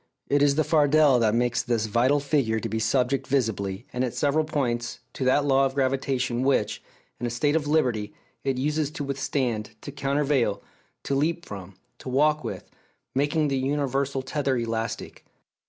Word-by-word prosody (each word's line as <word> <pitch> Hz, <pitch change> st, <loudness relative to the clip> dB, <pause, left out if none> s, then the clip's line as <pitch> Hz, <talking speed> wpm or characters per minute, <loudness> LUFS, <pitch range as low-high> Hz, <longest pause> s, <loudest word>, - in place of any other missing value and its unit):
It 145 Hz, 0 st, +3 dB
is 145 Hz, -1 st, +4 dB
the 155 Hz, -, +3 dB
fardel 150 Hz, -3 st, +4 dB
that 110 Hz, -1 st, +2 dB
makes 120 Hz, 0 st, +1 dB
this 115 Hz, -3 st, 0 dB
vital 120 Hz, +7 st, +2 dB
figure 135 Hz, -6 st, +1 dB
to -, -, -3 dB
be 110 Hz, +2 st, -2 dB
subject 125 Hz, +4 st, +1 dB
visibly, 110 Hz, -5 st, -1 dB
and 125 Hz, -, 0 dB
at 125 Hz, -, -2 dB
several 150 Hz, +2 st, +1 dB
points, 120 Hz, -6 st, -2 dB, 0.2 s
to -, -, -4 dB
that 140 Hz, +3 st, +3 dB
law 135 Hz, -1 st, +4 dB
of 135 Hz, -, -8 dB
gravitation 130 Hz, -2 st, 0 dB
which, 130 Hz, -6 st, +1 dB, 0.4 s
in 120 Hz, -, -2 dB
a -, -, -2 dB
state 145 Hz, +6 st, +1 dB
of 150 Hz, -2 st, 0 dB
liberty, 125 Hz, -9 st, +1 dB, 0.3 s
it 135 Hz, -2 st, 0 dB
uses 150 Hz, +2 st, 0 dB
to 155 Hz, -1 st, -5 dB
withstand, 130 Hz, -5 st, -2 dB
to 145 Hz, -, -7 dB
countervail, 140 Hz, -6 st, 0 dB, 0.4 s
to -, -, -2 dB
leap 165 Hz, +5 st, 0 dB
from, 95 Hz, -2 st, -9 dB, 0.2 s
to -, -, -7 dB
walk 150 Hz, +4 st, +2 dB
with, -, -, -6 dB, 0.5 s
making 145 Hz, +2 st, +1 dB
the 135 Hz, -1 st, 0 dB
universal 135 Hz, 0 st, -1 dB
tether 135 Hz, -1 st, -1 dB
elastic. 115 Hz, -1 st, -4 dB
135 Hz, 170 wpm, -26 LUFS, 120-145 Hz, 0.5 s, is